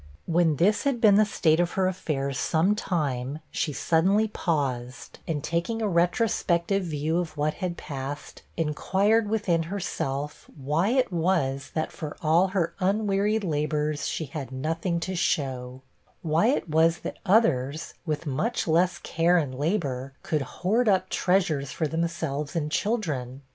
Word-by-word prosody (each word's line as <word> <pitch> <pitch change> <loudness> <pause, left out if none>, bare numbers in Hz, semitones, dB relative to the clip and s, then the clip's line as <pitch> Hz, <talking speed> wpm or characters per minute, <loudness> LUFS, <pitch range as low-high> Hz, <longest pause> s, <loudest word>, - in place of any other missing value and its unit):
When 165 -2 +2
this 195 +9 +2
had 275 -4 0
been 215 -3 +6
the 215 +2 +5
state 160 -5 +2
of 175 0 +1
her 190 -1 +2
affairs 140 -7 -2
some 165 +9 +2
time, 145 - -2
she 155 - -1
suddenly 190 +9 +2
paused, 130 - -3
and 150 -3 -2
taking 170 +8 -1
a 220 - 0
retrospective 180 0 +1
view 155 +1 -1
of 165 -3 -4
what 150 +1 +1
had 175 -2 -2
passed, 140 0 -6 0.2
inquired 195 +7 +1
within 200 -6 +1
herself, 150 -7 -4
why 150 +7 0
it 250 -5 +1
was 155 -6 0
that, 155 - -1
for 155 -2 -7
all 165 +4 +3
her 185 -3 -1
unwearied 205 +2 +1
labors, 150 -2 -1
she 160 - -2
had 140 -2 -6
nothing 165 +6 -1
to 185 +2 -3
show; 130 -5 -1 0.4
why 165 +6 +2
it 255 -7 +1
was 165 +2 +3
that - - -6
others, 155 - +2
with 155 -1 -3
much 155 - -1
less 175 +3 +3
care 170 +2 +2
and 145 -6 0
labor, 135 -3 -2
could 155 -2 0
hoard 210 - 0
up 185 -1 +2
treasures 170 -7 +1
for 160 - -1
themselves 160 -2 -2
and 150 -2 -1
children? 145 - -2
165 Hz, 150 wpm, -26 LUFS, 145-190 Hz, 0.4 s, been